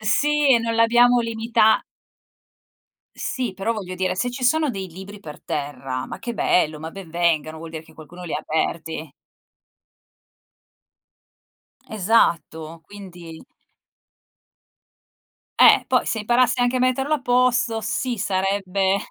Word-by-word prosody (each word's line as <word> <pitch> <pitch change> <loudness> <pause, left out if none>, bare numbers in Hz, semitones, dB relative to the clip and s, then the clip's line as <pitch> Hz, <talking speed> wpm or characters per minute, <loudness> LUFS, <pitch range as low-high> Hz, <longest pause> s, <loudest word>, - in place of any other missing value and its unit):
Sì 290 +7 +2
e - - +4
non 230 0 -2
l'abbiamo 240 +2 +5
limita 230 -1 +2 1.3
Sì, 250 -6 -3
però 195 +4 -2
voglio 190 -5 -6
dire 185 0 -1
se 245 +6 -2
ci 250 +1 -5
sono 305 +3 +2
dei 195 -4 -6
libri 190 +4 -11
per 150 -7 -11
terra- 135 -3 -4
ma - - -8
che 235 +1 -6
bello, 155 -7 +1
ma 160 +1 -7
ben 190 -2 -11
vengano- 160 -2 0
vuol 165 0 -9
dire 160 -1 -7
che 160 0 -19
qualcuno 170 +3 -12
li 165 - -6
ha - - -1
aperti. 160 -1 -3 2.7
Esatto, 170 -6 0
quindi 175 -5 -11 2.2
Eh, - - +7
poi - - +2
se 225 - -1
imparasse 245 +3 +2
anche 245 +1 +1
a - - +1
metterlo 255 +4 +1
a 300 - -3
posto 245 -2 +1
sì, 240 +3 -2
sarebbe 195 0 0
200 Hz, 130 wpm, -22 LUFS, 165-240 Hz, 2.7 s, Eh